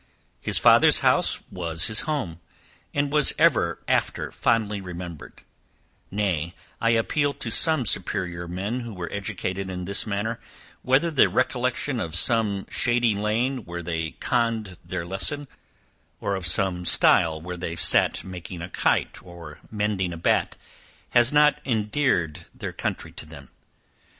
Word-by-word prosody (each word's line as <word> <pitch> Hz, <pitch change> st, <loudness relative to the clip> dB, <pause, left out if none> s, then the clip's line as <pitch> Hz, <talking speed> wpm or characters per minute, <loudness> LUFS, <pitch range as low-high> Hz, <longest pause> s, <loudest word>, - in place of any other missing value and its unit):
His -, -, 0 dB
father's -, -, +6 dB
house -, -, +2 dB
was 85 Hz, -2 st, 0 dB
his 110 Hz, -1 st, +3 dB
home, 95 Hz, -, -3 dB, 0.5 s
and 145 Hz, 0 st, -1 dB
was 150 Hz, -1 st, +3 dB
ever -, -, +2 dB
after -, -, -1 dB
fondly 105 Hz, -3 st, 0 dB
remembered; 90 Hz, -3 st, -9 dB, 0.7 s
nay, 90 Hz, -5 st, -2 dB, 0.3 s
I 115 Hz, -, +2 dB
appeal 140 Hz, +5 st, +1 dB
to 115 Hz, -, -6 dB
some 155 Hz, 0 st, +7 dB
superior 85 Hz, -4 st, -2 dB
men 100 Hz, +8 st, -4 dB
who 120 Hz, -4 st, -8 dB
were 85 Hz, -2 st, -6 dB
educated 95 Hz, -1 st, -4 dB
in 90 Hz, -1 st, -5 dB
this 100 Hz, +4 st, -3 dB
manner, 105 Hz, +3 st, -3 dB, 0.4 s
whether 135 Hz, +6 st, +2 dB
the 145 Hz, -, +4 dB
recollection 125 Hz, +1 st, -1 dB
of 85 Hz, -6 st, -4 dB
some 100 Hz, +1 st, +2 dB
shady 120 Hz, -2 st, +1 dB
lane 115 Hz, +5 st, -1 dB
where 85 Hz, 0 st, -7 dB
they 80 Hz, -1 st, -4 dB
conned 115 Hz, -6 st, -1 dB
their 85 Hz, -, -5 dB
lesson; 140 Hz, +11 st, -3 dB, 0.7 s
or, 100 Hz, -, -2 dB
of 95 Hz, -3 st, -2 dB
some 90 Hz, 0 st, +3 dB
stile, 80 Hz, -2 st, +4 dB
where 90 Hz, +3 st, -7 dB
they 85 Hz, -1 st, -5 dB
sat 80 Hz, -, +2 dB
making 90 Hz, -1 st, -8 dB
a 90 Hz, -, -7 dB
kite, -, -, -1 dB
or 85 Hz, -4 st, -12 dB
mending 105 Hz, -4 st, -2 dB
a -, -, -7 dB
bat, 80 Hz, -, 0 dB, 0.5 s
has 120 Hz, +2 st, +4 dB
not 150 Hz, 0 st, +3 dB
endeared 105 Hz, -, -1 dB
their -, -, -6 dB
country -, -, -4 dB
to -, -, -10 dB
them? -, -, -13 dB
100 Hz, 145 wpm, -24 LUFS, 85-120 Hz, 0.7 s, some